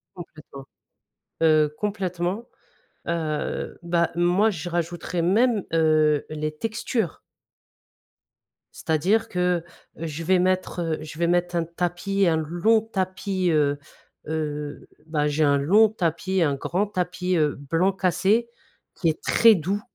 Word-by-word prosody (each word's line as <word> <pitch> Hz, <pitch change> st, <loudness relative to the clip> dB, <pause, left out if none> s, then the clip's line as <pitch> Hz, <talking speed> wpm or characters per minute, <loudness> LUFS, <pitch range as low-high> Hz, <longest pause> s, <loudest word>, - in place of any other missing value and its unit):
Complètement, 155 Hz, -6 st, -11 dB, 0.8 s
heu, 155 Hz, -2 st, +4 dB
complètement, 195 Hz, +1 st, -2 dB, 0.6 s
heu, 160 Hz, -3 st, -3 dB
bah 170 Hz, 0 st, +1 dB
moi 175 Hz, +5 st, +3 dB
je 175 Hz, -3 st, -5 dB
rajouterais 175 Hz, 0 st, -2 dB
même, 210 Hz, +4 st, +2 dB
heu, 155 Hz, -2 st, +3 dB
les 155 Hz, 0 st, -4 dB
textures. 220 Hz, -, -2 dB, 1.5 s
C'est-à-dire 180 Hz, +8 st, 0 dB
que, 180 Hz, -1 st, 0 dB, 0.3 s
heu, 165 Hz, -, -5 dB
je 160 Hz, +1 st, -5 dB
vais 185 Hz, +2 st, +3 dB
mettre, 185 Hz, 0 st, 0 dB
heu, 165 Hz, -2 st, -1 dB
je 155 Hz, 0 st, -9 dB
vais 170 Hz, -, +2 dB
mettre 175 Hz, 0 st, +1 dB
un 170 Hz, -, +1 dB
tapis 175 Hz, +3 st, -1 dB
un 160 Hz, -1 st, +3 dB
long 175 Hz, +8 st, +2 dB
tapis, 190 Hz, -3 st, -2 dB
heu 145 Hz, -2 st, +2 dB, 0.5 s
heu, 150 Hz, -2 st, -4 dB, 0.2 s
bah 150 Hz, -2 st, 0 dB
j'ai 150 Hz, +2 st, +1 dB
un 140 Hz, -1 st, +3 dB
long 200 Hz, +10 st, +5 dB
tapis, 185 Hz, -1 st, -1 dB
un 145 Hz, -3 st, +1 dB
grand 180 Hz, +8 st, -1 dB
tapis, 180 Hz, -1 st, -2 dB
heu, 150 Hz, -2 st, +1 dB
blanc 165 Hz, +7 st, 0 dB
cassé 195 Hz, +5 st, +1 dB, 0.4 s
qui 170 Hz, -, 0 dB
est 155 Hz, -, -3 dB
très 230 Hz, -2 st, +6 dB
doux. 190 Hz, +4 st, -2 dB
175 Hz, 130 wpm, -24 LUFS, 155-190 Hz, 1.5 s, très